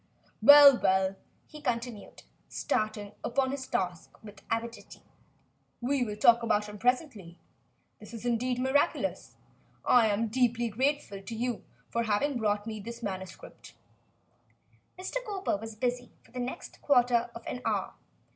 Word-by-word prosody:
"Well, 285 -2 +9
well," 190 0 +2 0.3
he 300 - -12
continued, 235 -4 -4 0.3
starting 215 -1 -2
upon 260 +2 0
his 270 -2 -5
task 180 -3 -3
with 210 -2 -12
avidity, 230 +1 -5 0.8
"we 260 +2 0
will 210 -3 -4
talk 235 +2 +5
about 210 -2 +1
him 210 0 -10
presently. 240 - -1 0.6
This - - -12
is 230 - -8
indeed 245 +1 0
miraculous. 265 +3 0 0.5
I 235 -3 +5
am 205 +1 0
most 225 -2 -2
grateful 260 - -1
deeply 240 -1 +2
grateful 260 -3 -1
to 225 +4 -7
you 240 0 -3 0.3
for 235 - 0
having 240 +5 0
brought 205 -1 0
me 220 -1 -5
this 235 +3 -8
manuscript." 190 - -8 1.2
Mr. 440 +7 -4
Cowper 395 - -2
was 225 +1 -8
busy 245 +2 -2
for - - -23
the 250 - -6
next 250 +1 -6
quarter 245 -3 +3
of 230 - -10
an 250 - -5
hour. - - -1
235 Hz, 145 wpm, -29 LUFS, 210-255 Hz, 1.2 s, Well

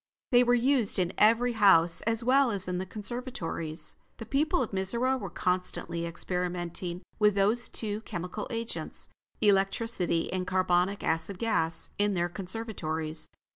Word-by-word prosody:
They 245 0 +6
were 245 0 +4
used 245 -3 +2
in 180 -1 0
every 230 +3 +4
house, 185 -6 +5
as 225 +1 +1
well 265 +2 +4
as 200 -4 -1
in 180 0 -2
the 190 - -4
conservatories. 185 - -4 0.2
The 225 - -7
people 300 +7 +1
of 230 - -6
Mizora 235 +7 0
were 195 -4 -5
constantly 180 -2 -1
experimenting 175 0 -3 0.2
with 210 -2 +4
those 215 +4 +2
two 210 -1 -2
chemical 180 0 -5
agents, 230 -1 -3 0.3
electricity 195 -4 +1
and 185 -1 -2
carbonic 185 +1 +1
acid 165 +4 -1
gas, 165 -7 0
in 205 -1 +2
their 175 0 0
conservatories. 175 -5 -3
195 Hz, 140 wpm, -29 LUFS, 175-230 Hz, 0.3 s, They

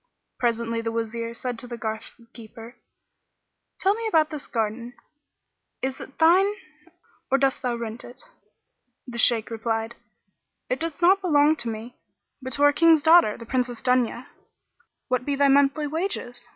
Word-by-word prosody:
Presently 230 -1 -1
the 225 0 -3
Wazir 230 0 -4
said 245 -1 -4
to 245 - -2
the 240 -1 -7
garth 220 0 -6
keeper, 230 +1 -12 1.0
"Tell 390 +1 +3
me 455 +1 -4
about 320 -6 +2
this 300 -2 -6
garden: 230 +2 -3 0.9
is 265 0 -3
it 275 - -11
thine 375 +5 +4 0.7
or 270 - +3
dost 270 0 +1
thou 250 -2 -1
rent 230 0 -6
it?" 245 - -12 0.9
The 240 -3 -7
Shaykh 230 -1 +4
replied, 225 0 -2 0.8
"It 255 - -1
doth 330 +1 -4
not 385 +3 +5
belong 305 -4 +3
to 235 -1 -3
me, 225 +3 -8 0.4
but 260 0 -6
to 285 - 0
our 290 0 +6
King's 325 -1 +4
daughter, 325 -10 +5
the 230 - -10
Princess 250 -1 -2
Dunya." 250 -1 +1 0.8
"What 255 0 0
be 285 +1 -1
thy 280 0 +3
monthly 280 +2 +3
wages?" 290 -7 -4
250 Hz, 155 wpm, -24 LUFS, 230-295 Hz, 1.0 s, our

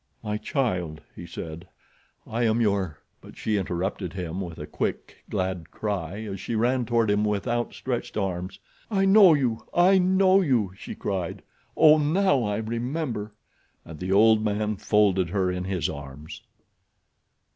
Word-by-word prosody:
"My 105 0 -2
child," 90 - -2
he 85 - -9
said, 85 +1 -8 0.6
"I 115 +2 -3
am 115 -1 +2
your—" 100 -8 0 0.2
But - - -14
she 110 - -1
interrupted 90 -1 -3
him 90 0 -4
with 85 -3 -6
a 75 - -6
quick, - - -4
glad 95 -3 -2
cry, 100 -2 -4
as 100 -3 -6
she 115 +5 -4
ran 120 +3 +1
toward 115 -2 +2
him 105 +1 +2
with 105 +1 -1
outstretched 120 +1 -3
arms. 95 -2 -3 0.3
"I 195 -3 +2
know 195 -4 +7
you! 125 -6 -1
I 185 +2 +5
know 190 +1 +4
you!" 120 - +1
she - - -8
cried. 95 -4 -3 0.3
"Oh, 155 0 +7
now 150 -1 +2
I 105 -1 -1
remember," 115 -1 -3 0.5
and 80 -1 -10
the 90 +1 -3
old 110 +2 +5
man 105 0 -1
folded 100 -3 +2
her 95 0 0
in 90 0 -3
his 95 -3 -1
arms. 70 +1 -8
105 Hz, 155 wpm, -25 LUFS, 90-120 Hz, 0.6 s, know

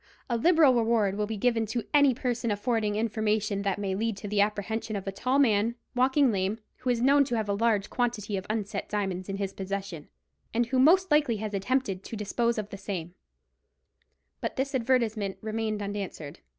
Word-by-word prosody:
—A - - +2
liberal 315 +2 +5
reward 225 -4 +2
will 210 0 -1
be 220 0 -4
given 225 0 +1
to 225 +2 -2
any 285 -2 +6
person 240 -2 -2
affording 210 0 0
information 215 -2 0
that 200 -2 -1
may 200 -2 -2
lead 220 +1 -1
to 205 - -7
the 205 0 +2
apprehension 215 +1 -1
of 195 - -4
a 195 - -2
tall 255 +7 0
man, 230 -4 +3 0.2
walking 260 +1 +3
lame, 195 +1 -1 0.2
who 255 - -3
is 240 -1 +1
known 280 +2 +5
to 245 - -2
have 220 -2 -1
a 200 - 0
large 210 -1 +1
quantity 230 -4 -1
of 190 0 -4
unset 215 -1 -3
diamonds 190 -2 -2
in 195 - -3
his 195 -1 -3
possession, 195 -4 -5 0.5
and 240 +1 +3
who 255 +2 0
most 360 +6 +5
likely 295 -7 +3
has 210 0 -5
attempted 200 -1 -1
to 225 - -7
dispose 235 +3 0
of 210 -1 -3
the 200 - -6
same_." 185 -4 -5 1.3
But - - -3
this 275 +2 -2
advertisement 230 -6 0
remained 215 -1 -2
unanswered. 200 -7 -5
215 Hz, 190 wpm, -28 LUFS, 200-240 Hz, 1.3 s, any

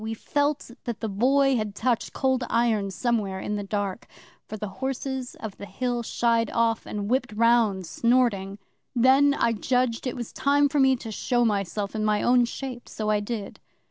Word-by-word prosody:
We 220 0 -3
felt 290 +2 -1
that 235 -3 -4
the 225 - -3
Boy 265 +6 +3
had 210 -2 -3
touched 240 -1 0
Cold 260 -1 0
Iron 225 -4 +1
somewhere 205 -2 -1
in 210 - -3
the 205 - -2
dark, 200 +1 -3 0.4
for 215 - -6
the 210 0 -4
Horses 265 -1 -3
of 215 -3 -8
the 200 - -8
Hill 245 0 -2
shied 230 -1 +1
off, 230 -1 0
and 205 -1 -4
whipped 250 +1 0
round, 225 -4 +3
snorting. 210 -2 +1 0.4
'Then 270 +4 +5
I 230 -4 +2
judged 250 +2 0
it 255 - -3
was 240 -3 -6
time 285 +1 +3
for 290 - 0
me 265 -1 +5
to 230 -2 -7
show 240 +3 +1
myself 200 -1 -1
in 215 -1 -2
my 210 -1 +1
own 245 0 +4
shape; 245 0 -7
so 215 -1 -2
I 210 - +2
did. 205 -1 -5
235 Hz, 185 wpm, -25 LUFS, 210-255 Hz, 0.4 s, Then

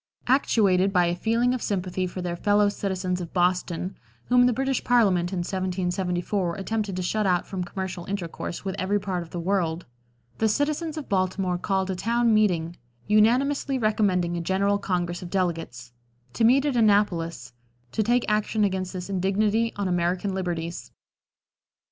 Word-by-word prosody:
Actuated 200 -8 +3
by 180 -2 +3
a 170 0 0
feeling 230 +6 +1
of 255 - -3
sympathy 185 -2 -2
for 180 0 -6
their 175 -1 -2
fellow 205 +3 +3
citizens 185 -3 -2
of 170 - -7
Boston 180 0 0 0.3
whom 245 0 +5
the - - +3
British 270 +2 -1
Parliament 195 -8 +3
in 185 -2 -2
1774 180 -1 -1
attempted 205 0 -2
to 185 - -2
shut 210 +3 0
out 180 -1 +2
from 185 -2 -4
commercial 180 -1 -5
intercourse 185 -2 -5
with 190 - -2
every 200 +2 +1
part 185 -3 -3
of 170 - -9
the 175 - -5
world 170 -2 -1 0.5
the 220 - +3
citizens 300 +6 -1
of 305 - -6
Baltimore 185 -1 0
called 190 0 0
a - - -2
town 230 +4 +1
meeting, 175 -6 +2 0.3
unanimously 255 +6 +2
recommending 205 -6 +1
a 170 - -2
general 200 +3 +1
congress 175 -3 -2
of 180 - -7
delegates, 165 -10 -3 0.4
to - - 0
meet 260 +5 +5
at 285 -3 0
Annapolis, 200 - +1 0.4
to 220 - 0
take 240 +3 +2
action 215 0 +1
against 190 -2 -1
this 180 -1 -5
indignity 205 +4 +1
on 200 -1 -2
American 180 +2 0
liberties. 170 -3 -4
190 Hz, 160 wpm, -25 LUFS, 180-215 Hz, 0.5 s, whom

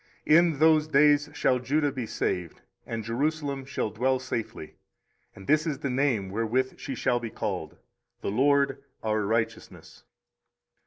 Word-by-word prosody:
24:033:016 155 - +6
In 170 -4 +2
those 155 0 +4
days 150 0 +4
shall 130 -2 +2
Judah 145 +3 0
be 130 -4 -5
saved, 90 -5 -3 0.3
and 115 -1 -4
Jerusalem 140 +3 -2
shall 120 -5 -3
dwell 130 +4 +1
safely: 115 -8 -5 0.6
and 95 - -12
this 155 - +2
is 150 -3 -1
the 140 -2 -3
name 125 -8 0
wherewith 115 +5 -1
she 135 - -5
shall 120 +1 +1
be 115 -1 -5
called, - - -4 0.4
The - - -2
LORD 140 +3 +2 0.2
our 110 -1 0
righteousness. 110 +2 -3
130 Hz, 150 wpm, -27 LUFS, 115-145 Hz, 0.6 s, 24:033:016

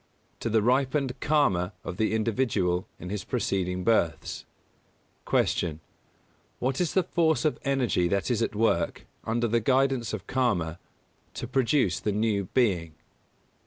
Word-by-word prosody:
To 115 - -2
the 110 -1 +2
ripened 130 +2 +1
Karma 105 - +2
of 90 - -6
the 110 +1 +1
individual 105 -6 0
in 90 +2 -7
his 105 -1 -3
preceding 90 -6 -1
births. 90 -8 0 0.8
238. 85 - +1
Q. 80 - -26 0.8
_What 130 +5 0
is 175 - -1
the 190 - +4
force 160 -3 +1
of 155 - +1
energy 130 -10 +1
that 100 +6 0
is 115 -2 0
at 115 - -1
work, 110 +2 +1 0.2
under 120 +1 0
the 115 +1 +2
guidance 130 -1 +1
of 110 -4 -5
Karma, 90 -11 0 0.6
to - - -4
produce 130 - +2
the 105 - -1
new 105 -1 0
being? 90 -8 0
115 Hz, 145 wpm, -27 LUFS, 95-130 Hz, 0.8 s, the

